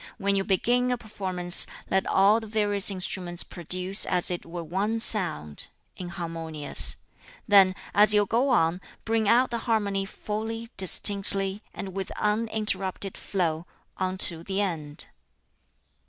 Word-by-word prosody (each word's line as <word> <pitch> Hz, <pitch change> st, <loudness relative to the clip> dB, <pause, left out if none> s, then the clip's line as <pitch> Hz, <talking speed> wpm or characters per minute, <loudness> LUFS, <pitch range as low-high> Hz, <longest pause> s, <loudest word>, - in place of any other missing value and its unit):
When 200 Hz, -2 st, -1 dB
you 195 Hz, -, 0 dB
begin 240 Hz, +6 st, 0 dB
a 250 Hz, -, -1 dB
performance, 185 Hz, -5 st, +3 dB, 0.2 s
let 190 Hz, 0 st, 0 dB
all 200 Hz, +3 st, +3 dB
the 220 Hz, -, -10 dB
various 205 Hz, -2 st, +1 dB
instruments 180 Hz, -2 st, -1 dB
produce 185 Hz, +3 st, -1 dB
as 180 Hz, 0 st, +2 dB
it 175 Hz, -, -6 dB
were 170 Hz, 0 st, -7 dB
one 200 Hz, +7 st, -3 dB
sound 125 Hz, -, 0 dB, 0.3 s
(inharmonious); 165 Hz, -4 st, -1 dB, 0.5 s
then, 195 Hz, -3 st, +5 dB, 0.2 s
as 210 Hz, +1 st, +4 dB
you 210 Hz, -1 st, +5 dB
go 240 Hz, +7 st, 0 dB
on, 175 Hz, -7 st, +1 dB, 0.2 s
bring 225 Hz, -2 st, 0 dB
out 245 Hz, +1 st, +2 dB
the 235 Hz, -, -3 dB
harmony 200 Hz, -3 st, -1 dB
fully, 220 Hz, +3 st, -6 dB
distinctly, 195 Hz, +1 st, +4 dB
and 190 Hz, -1 st, -8 dB
with 195 Hz, -1 st, -5 dB
uninterrupted 210 Hz, -3 st, -3 dB
flow, 170 Hz, -3 st, -3 dB, 0.3 s
unto 185 Hz, -3 st, 0 dB
the 190 Hz, +3 st, -4 dB
end." 160 Hz, -7 st, -4 dB
195 Hz, 130 wpm, -25 LUFS, 180-215 Hz, 0.5 s, then